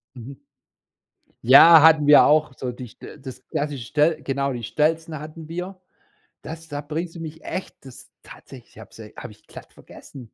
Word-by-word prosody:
Mhm. 130 +3 -11 1.1
Ja, 155 +6 +8
hatten 155 -2 +5
wir 145 - +7
auch 150 -2 +2
so 125 -1 -5
dichte 125 +4 -12
das 130 -2 -12
klassische 145 -5 -5
stell 150 +2 0
genau, 140 0 -3
die 120 - -7
Stelzen 155 +6 -2
hatten 155 +1 -11
wir. 180 +3 -7 0.6
Das 160 +1 -10
da 145 -1 -6
bringst 160 +4 -6
du - - -9
mich 160 0 -10
echt 190 - -6
das 130 - -14
tatsächlich - - -16
habe - - -15
sie - - -13
habe - - -10
ich - - -21
glatt - - -14
vergessen. 135 - -15
150 Hz, 170 wpm, -22 LUFS, 135-160 Hz, 1.1 s, Ja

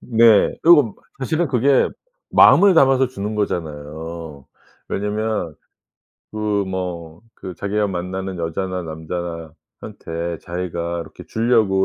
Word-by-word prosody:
네. 115 -3 +4
그리고 150 - +6 0.2
사실은 160 +4 -1
그게 130 +2 +3 0.4
마음을 200 -2 +7
담아서 135 -3 +4
주는 105 -4 -5
거잖아요. 80 -5 -5 0.4
왜냐하면 105 -4 -2 0.8
그 105 -2 -1
뭐 85 -3 -5
그 90 -2 -8
자기가 100 +4 -1
만나는 95 0 -4
여자나 90 +3 -3
남자나 80 0 -6 0.3
한테 85 0 -5
자기가 85 -1 -4
이렇게 80 - -11
주려고 110 -5 +2
95 Hz, 260 characters per minute, -20 LUFS, 85-110 Hz, 0.8 s, 마음을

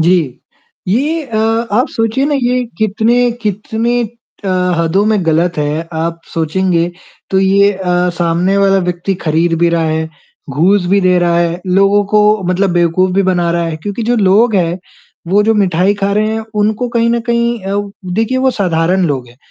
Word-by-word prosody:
जी। 160 -6 +1 0.5
ये 295 - 0
अ, 230 -5 -5 0.4
आप 245 +5 +2
सोचिए 225 +3 -1
ना 295 - 0
ये 250 +1 +1 0.2
कितने 225 +3 +2
कितने 220 +3 -1 0.4
अ, - - -2 0.3
हदों 170 +4 +1
में 215 -4 +1
गलत 170 +2 +1
है, 150 +3 -2
आप 165 +1 -3
सोचेंगे 170 +1 0 0.4
तो 190 - +2
ये 195 +1 +4
अ, 180 -2 0
सामने 175 +3 +1
वाला 195 -1 +3
व्यक्ति 180 +1 -2
खरीद 165 +2 +1
भी 170 +1 +3
रहा 170 -1 0
है, 160 0 -2 0.4
घूस 180 +7 +2
भी 200 +3 +2
दे 180 -1 +3
रहा 175 -1 +1
है। 170 0 -1
लोगों 195 +2 +3
को 210 -1 +3
मतलब 185 +1 +1
बेवकूफ 175 +2 +2
भी 195 - +3
बना 180 -2 +1
रहा 170 0 0
है। 165 -1 -4
क्योंकि 205 +3 -4
जो 240 +2 +1
लोग 215 +3 +3
हैं, 175 -2 0 0.5
वो 200 +3 +3
जो 220 +1 +2
मिठाई 190 -1 +2
खा 200 0 -1
रहे 210 +1 +1
हैं, 220 0 -3
उनको 215 +3 0
कहीं 235 0 +1
न 235 0 0
कहीं 235 0 +1
अ, 200 +1 -1 0.3
देखिये 225 +5 0
वो 260 0 +3
साधारण 180 -3 0
लोग 130 -5 -3
हैं 120 - -19
190 Hz, 180 wpm, -14 LUFS, 170-215 Hz, 0.5 s, ये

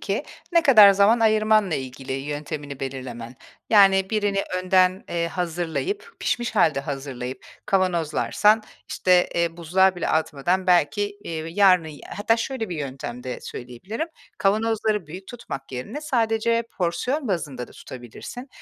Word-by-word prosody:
ki, - - -2 0.3
ne 335 -1 +5
kadar 220 -9 +8
zaman 200 +4 +4
ayırmanla 215 -4 +3
ilgili 130 0 -6
yöntemini 145 0 -5
belirlemen. 125 -3 -6 0.3
Yani, 195 -2 +5
birini 205 -2 0 0.2
önden, 185 0 +2
eee, 170 -1 -1
hazırlayıp, 180 - -3
pişmiş 240 -2 -1
hâlde 160 -8 +3
hazırlayıp 135 -3 -6 0.2
kavanozlarsan, 185 +4 +2 0.3
işte, 180 -1 +3
eee, 170 -1 0
buzluğa 185 +3 +3
bile 175 - -2
atmadan 160 +4 0
belki, 185 +4 +2
iii, 160 0 -5
yarının 185 -5 +5
y 150 -2 -11 0.2
hatta 225 +2 +2
şöyle 230 -1 -3
bir 175 - -4
yöntem 130 -4 -6
de 125 0 -5
söyleyebilirim; 185 - -6 0.3
kavanozları 215 -1 +1
büyük 185 +5 -9
tutmak 135 - -8
yerine 130 - -5
sadece 230 -5 +1 0.2
porsiyon 245 - -1
bazında 145 -10 -3
da - - -16
tutabilirsin. 130 - -10
185 Hz, 130 wpm, -23 LUFS, 145-215 Hz, 0.3 s, kadar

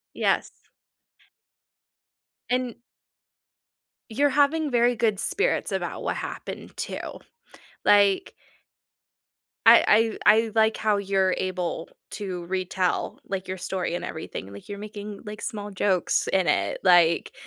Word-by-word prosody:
Yes. - - 0 2.0
An 250 -2 0 1.4
You're 285 +6 +2
having 290 +2 +2
very 240 0 +3
good 215 -3 +1
spirits 455 - -1
about - - -3
what - - -2
happened, - - -7
too, - - -4 0.9
like 200 -2 +4 1.3
I 225 +1 +6
I 215 +2 +7
I 220 - -8
like 220 0 +3
how 210 -2 +1
you're 190 -2 +1
able 180 -3 -3 0.2
to 185 -4 -5
retell, 185 0 -1
like, 190 -1 -4
your 185 - -3
story 180 -1 -3
and 175 - -4
everything, 100 -10 -7
like 100 - -12
you're 200 - -6
making, 205 -1 -8
like, 210 0 -8
small 205 -1 -5
jokes 185 -2 +1
in 190 -2 +2
it, 100 -10 +1
like 175 -3 +4
200 Hz, 120 wpm, -25 LUFS, 185-220 Hz, 2.0 s, I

